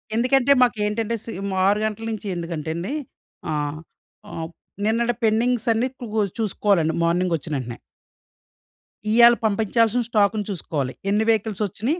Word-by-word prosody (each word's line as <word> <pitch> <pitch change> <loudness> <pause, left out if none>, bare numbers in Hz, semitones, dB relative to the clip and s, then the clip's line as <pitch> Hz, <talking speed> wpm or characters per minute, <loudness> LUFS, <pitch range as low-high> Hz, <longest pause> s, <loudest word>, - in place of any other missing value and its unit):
ఎందుకంటే, 255 +3 +3
మాకేంటంటే 220 -1 0
సేమ్ 200 -3 -4 0.2
6 205 +1 +3
గంటల 215 +1 -3
నుంచి 215 -2 -5
ఎందుకంటేండి, 170 - -4 0.6
ఆహ్, 150 0 -2 0.6
ఆప్ 160 +1 -7 0.3
నిన్నటి 235 +2 +1
పెండింగ్స్ 230 +1 +1
అన్నీ 235 +3 +1
క్లో 220 -3 -1 0.2
చూసుకోవాలండి, 195 -6 +1
మార్నింగ్ 175 +1 +1
ఒచ్చినేంటనే. 135 -6 -5 1.3
ఇయ్యాల 235 +1 +7
పంపించాల్సిన 225 +3 +2
స్టాక్‌న్ని 210 -1 +2
చూసుకోవాలి. 145 -7 -3 0.2
ఎన్ని 210 +2 +2
వెహికల్స్ 215 -1 +1
వచ్చినియి, 250 - -2
210 Hz, 115 wpm, -23 LUFS, 170-230 Hz, 1.3 s, ఇయ్యాల